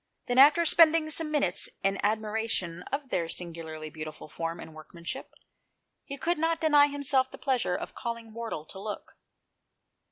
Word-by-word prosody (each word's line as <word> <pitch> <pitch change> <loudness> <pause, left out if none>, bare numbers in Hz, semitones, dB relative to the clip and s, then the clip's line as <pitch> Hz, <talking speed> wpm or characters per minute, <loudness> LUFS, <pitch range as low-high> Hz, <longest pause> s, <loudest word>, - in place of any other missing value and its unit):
Then 245 +1 +2
after 305 +5 +7
spending 320 -1 +5
some 315 0 -1
minutes 290 -13 +1
in 195 0 +1
admiration 215 -4 -1
of 275 -1 -3
their 170 -7 -1
singularly 160 -3 -6
beautiful 155 0 -8
form 165 +2 -4
and 160 - -10
workmanship, 170 +10 -7 0.7
he 280 -1 -7
could 340 +4 0
not 325 0 +1
deny 295 -2 +5
himself 280 -2 +1
the - - -11
pleasure 250 -9 0
of - - -6
calling 230 -1 -6
Wardle 225 -9 -5
to 190 - -10
look. 210 +1 -7
230 Hz, 155 wpm, -29 LUFS, 170-290 Hz, 0.7 s, after